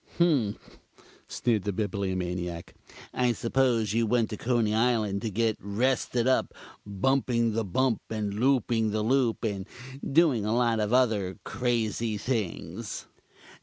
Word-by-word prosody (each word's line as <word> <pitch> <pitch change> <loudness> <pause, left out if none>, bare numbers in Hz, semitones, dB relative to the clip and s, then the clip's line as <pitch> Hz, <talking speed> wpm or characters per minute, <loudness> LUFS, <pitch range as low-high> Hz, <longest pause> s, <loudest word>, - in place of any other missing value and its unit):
"Humph!" 140 -12 0 0.5
sneered 115 -4 0
the 105 - -1
Bibliomaniac. 90 -4 -3 0.4
"I 125 -1 +2
suppose 115 -3 +1
you 115 0 +2
went 115 -1 +1
to - - -2
Coney 115 -3 +1
Island 110 -4 +1
to 115 - -2
get 110 +1 0
rested 120 +3 0
up 130 0 +1 0.3
Bumping 115 +2 +1
the 115 +1 0
Bump 115 +5 0
and 105 -2 -2
Looping 115 -1 +2
the 105 0 -1
Loop 125 0 +1
and 100 -3 -2 0.4
doing 145 -7 +4
a 110 +2 0
lot 120 -2 +2
of 105 0 0
other 110 -7 +2
crazy 115 -2 -1
things." 105 -3 -4
115 Hz, 130 wpm, -28 LUFS, 105-125 Hz, 0.5 s, doing